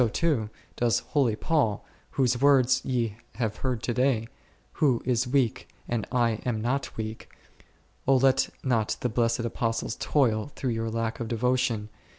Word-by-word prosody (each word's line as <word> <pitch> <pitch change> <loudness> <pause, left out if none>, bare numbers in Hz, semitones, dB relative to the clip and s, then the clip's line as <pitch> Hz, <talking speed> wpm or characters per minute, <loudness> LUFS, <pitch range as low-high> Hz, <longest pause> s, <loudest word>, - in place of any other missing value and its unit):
O - - +7
O - - +3
o 165 +10 -1
o 110 -3 -4 0.3
does 120 -2 +2 0.2
holy 130 -7 +3
Paul, 115 -6 0 0.3
whose 125 -2 +2
words 130 -2 +5
ye 115 -5 -1 0.2
have 110 -2 -2
heard 125 -4 -2
to 120 - -1
day, 125 -2 +1 0.5
Who 130 -6 +3
is 125 0 +1
weak 125 -3 0 0.2
and 120 -3 -2
I 120 -3 +1
am 120 -3 -1
not 130 +5 -2
weak? 110 0 -5 0.8
O 135 - +6
let 135 +1 +3
not 115 -5 +1
the 125 - 0
blessed 115 0 +1
Apostles 115 -1 -2
toil 130 -2 +1
through 130 - -2
your 115 0 -2
lack 115 0 -2
of 115 - -3
devotion. 120 -2 0
120 Hz, 165 wpm, -27 LUFS, 115-130 Hz, 0.8 s, O